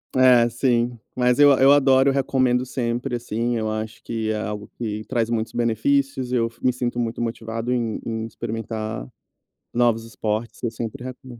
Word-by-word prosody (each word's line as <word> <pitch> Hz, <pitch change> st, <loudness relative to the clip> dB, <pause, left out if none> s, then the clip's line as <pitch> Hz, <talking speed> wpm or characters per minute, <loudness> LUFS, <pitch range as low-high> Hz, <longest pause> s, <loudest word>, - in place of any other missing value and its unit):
É, 125 Hz, -2 st, +6 dB
sim. 120 Hz, 0 st, +1 dB, 0.2 s
Mas 125 Hz, 0 st, +2 dB
eu 145 Hz, -1 st, +8 dB
a 130 Hz, -, +3 dB
eu 135 Hz, +1 st, +7 dB
adoro, 135 Hz, -1 st, +5 dB
recomendo 130 Hz, -2 st, +1 dB
sempre, 120 Hz, 0 st, -2 dB
assim. 120 Hz, 0 st, -2 dB
Eu 110 Hz, -1 st, -1 dB
acho 110 Hz, +2 st, -4 dB
que 110 Hz, -1 st, -2 dB
é 110 Hz, -, -1 dB
algo 105 Hz, -1 st, -5 dB
que 110 Hz, -2 st, -3 dB
traz 115 Hz, -3 st, -1 dB
muitos 115 Hz, -1 st, -1 dB
benefícios, 130 Hz, +3 st, 0 dB
eu 115 Hz, -2 st, +2 dB
f 115 Hz, -, -24 dB
me 125 Hz, -, +5 dB
sinto 120 Hz, -1 st, -3 dB
muito 115 Hz, 0 st, -2 dB
motivado 115 Hz, +1 st, -3 dB
em 115 Hz, -3 st, -1 dB
em 110 Hz, -1 st, -3 dB
experimentar 110 Hz, -, -5 dB, 0.7 s
novos 120 Hz, -2 st, +2 dB
esportes. 115 Hz, 0 st, -3 dB
Eu 115 Hz, -, 0 dB
sempre 120 Hz, +3 st, -6 dB
recome 125 Hz, -1 st, -9 dB
120 Hz, 175 wpm, -23 LUFS, 115-125 Hz, 0.7 s, eu